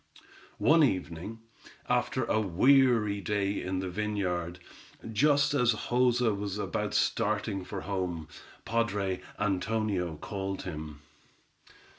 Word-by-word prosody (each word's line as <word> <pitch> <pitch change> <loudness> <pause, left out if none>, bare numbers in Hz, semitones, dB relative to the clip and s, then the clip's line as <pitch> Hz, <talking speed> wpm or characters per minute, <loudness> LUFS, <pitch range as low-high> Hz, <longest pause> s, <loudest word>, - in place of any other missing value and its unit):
One 160 +1 +5
evening, 95 - -2 0.5
after - - +1
a 110 - +1
weary 110 +1 +4
day 100 +1 -1
in 95 0 -2
the 95 - -3
vineyard, 90 -3 -2 0.6
just 145 +4 +3
as 125 -4 +3
Joza 120 -1 +2
was 100 0 -4
about 105 - -2
starting 105 -3 0
for 95 +1 -6
home, 90 -5 -3 0.4
padre 100 -5 0 0.2
Antonio 100 -3 -1
called 95 +4 -4
him. 75 -4 -7
100 Hz, 105 wpm, -29 LUFS, 90-115 Hz, 0.6 s, One